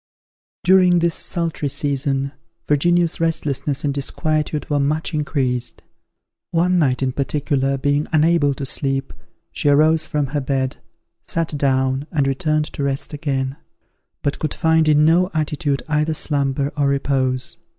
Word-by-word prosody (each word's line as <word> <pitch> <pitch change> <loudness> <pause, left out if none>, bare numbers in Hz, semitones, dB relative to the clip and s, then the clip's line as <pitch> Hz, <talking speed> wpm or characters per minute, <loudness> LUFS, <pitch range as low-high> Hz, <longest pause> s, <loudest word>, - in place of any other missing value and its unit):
During 180 -1 +5
this 170 -1 +2
sultry 165 -5 -1
season, 140 -1 -1 0.4
Virginia's 170 +3 +2
restlessness 150 -3 -1
and 145 -1 0
disquietude 150 +1 -1
were 145 -1 0
much 155 +4 -1
increased. 130 -5 -2 0.7
One 180 +2 +2
night, 135 -4 +1
in 130 - 0
particular, 140 0 -1
being 145 +2 0
unable 155 -2 +3
to 135 - -5
sleep, 135 0 -1 0.4
she 145 - 0
arose 155 +2 +4
from 150 -1 0
her 145 - 0
bed, 130 -1 -1 0.4
sat 165 -2 -2
down, 135 0 0
and 145 -4 +1
returned 150 +3 0
to - - -5
rest 140 +1 -1
again; 135 -2 -2 0.7
but 145 - -1
could 155 - -3
find 160 -1 +2
in 150 0 +5
no 175 +3 +4
attitude 150 -2 -1
either 155 +1 0
slumber 140 -2 0
or 145 -1 +1
repose. 135 -2 -1
145 Hz, 140 wpm, -20 LUFS, 135-155 Hz, 0.7 s, During